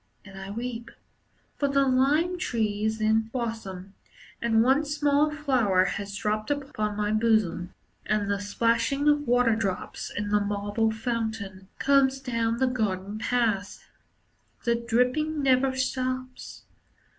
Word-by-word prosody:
And 195 -1 -12
I 195 0 -8
weep; 235 +2 -5 0.7
For 285 - +2
the 275 0 +2
lime 295 +8 +2
tree 215 - -1
is 220 0 -1
in 220 +1 +2
blossom 220 -6 -5 0.5
And 225 -1 +3
one 265 +5 +3
small 295 0 +2
flower 255 -11 +2
has 200 +1 -4
dropped 215 0 -2
upon 265 -8 -2
my 210 0 0
bosom. 215 -5 +1 0.3
And 210 -1 +1
the 200 0 0 0.2
plashing 235 +5 +2
of 290 -1 +3
waterdrops 230 -5 0
In 205 0 -4
the 210 0 +3
marble 205 +2 0
fountain 220 -4 -4
Comes 270 -1 +3
down 230 -3 -1
the 260 - +2
garden 210 -4 -2
paths. 220 -4 -1 0.8
The 235 - +2
dripping 250 +6 0
never 260 0 +3
stops. 255 0 -3
230 Hz, 130 wpm, -26 LUFS, 210-260 Hz, 0.8 s, And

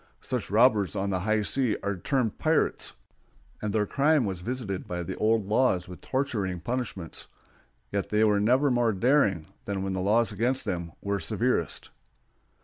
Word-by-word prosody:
Such - - -2
robbers 105 - +4
on 100 +1 -1
the 95 - 0
high 110 +3 +1
seas 125 0 0
are 100 0 -1
termed 115 +4 -1
pirates, 160 0 +1 0.7
and 105 - -2
their 105 0 +1
crime 140 +2 +3
was 95 -3 -3
visited 110 -4 -4
by 90 0 -3
the - - -5
old 110 -1 +2
laws 105 -4 +2
with 90 -1 -10
torturing 110 -10 -1
punishments; 120 -6 -4 0.6
yet 100 -1 -2
they 105 +1 +3
were 105 -2 +4
never 130 +7 +3
more 120 -2 +2
daring 100 - +2 0.2
than 100 -1 -2
when 95 -1 -2
the 95 - -2
laws 110 +4 +2
against 120 +6 0
them 85 -2 -3
were 100 -1 -1
severest. 80 - -1
105 Hz, 165 wpm, -27 LUFS, 95-125 Hz, 0.7 s, robbers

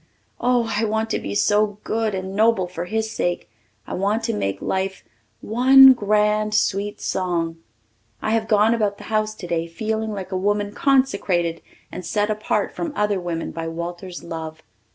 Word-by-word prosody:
Oh, 245 -2 +1
I 215 - 0
want 220 +1 -1
to - - 0
be - - -5
so 205 0 +2
good 220 -2 -1
and 190 +1 -5
noble 220 -3 +3
for 175 -1 -6
his 220 +3 -2
sake. 175 -4 -2 0.4
I - - -7
want 205 +4 0
to 230 0 -1
make 100 - -2
life 190 0 -2 0.4
"one 265 +4 +7
grand 210 -1 +1
sweet 205 -1 0
song." 170 -3 -2 0.6
I 215 - -2
have 225 -1 +1
gone 210 +1 +4
about 210 -3 0
the - - -11
house 215 0 0
today 170 -4 -3
feeling 220 +5 -3
like 195 -2 -6
a - - -2
woman 205 +1 0
consecrated 200 -12 +1 0.3
and 180 - -6
set 210 +4 0
apart 215 0 -1
from 330 -3 -4
other 210 -2 +1
women 170 -2 -4
by 165 0 -5
Walter's 175 +2 -6
love. 160 -1 -7
205 Hz, 170 wpm, -22 LUFS, 180-220 Hz, 0.6 s, one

